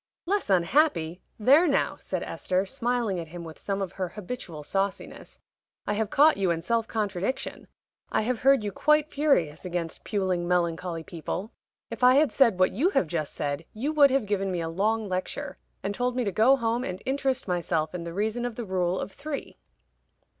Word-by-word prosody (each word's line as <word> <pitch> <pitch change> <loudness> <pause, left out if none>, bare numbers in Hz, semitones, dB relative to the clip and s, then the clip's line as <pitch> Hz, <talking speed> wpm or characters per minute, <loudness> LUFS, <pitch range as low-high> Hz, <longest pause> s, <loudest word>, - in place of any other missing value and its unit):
"Less 395 - 0
unhappy! 180 - +2 0.2
There 280 +10 +5
now!" 280 - +1
said - - -4
Esther, 185 +1 -1
smiling 235 -4 -1
at 165 - -6
him 170 +2 -8
with 160 -1 -10
some 195 0 -2
of 185 - -5
her 185 -2 -3
habitual 180 -6 -7
sauciness, 195 +5 -3 0.5
"I 210 - 0
have 215 0 -1
caught 300 +2 +5
you 195 -2 +1
in 165 -1 -1
self 230 +4 0
contradiction. 205 +2 -3 0.4
I - - +1
have 240 +1 -1
heard 270 -3 +4
you 205 - -2
quite 300 +7 +2
furious 225 - +1
against 175 -3 -4
puling, 185 -4 -1
melancholy 170 -1 0
people. 175 +6 -5 0.4
If - - -5
I 250 +1 +7
had 295 0 +4
said 235 -8 +4
what 185 0 +4
you 285 - +2
have 390 - +2
just 155 -2 -3
said, 145 +1 -2
you 275 +8 -2
would 290 -2 +7
have 270 -3 +1
given 195 -2 -1
me 180 - -1
a 165 - -3
long 215 +5 0
lecture, 195 +10 -4 0.2
and 200 +1 -1
told 245 +3 -1
me 250 - +1
to 200 - -1
go 230 +8 +5
home 235 -1 -1
and 185 -5 -4
interest 265 -2 -1
myself 170 -3 -1
in 180 -2 -4
the 170 - -5
reason 215 +6 -1
of 245 -2 -3
the 235 - -5
rule 185 -1 0
of 195 - -4
three." 280 +3 -6
200 Hz, 195 wpm, -27 LUFS, 175-255 Hz, 0.5 s, I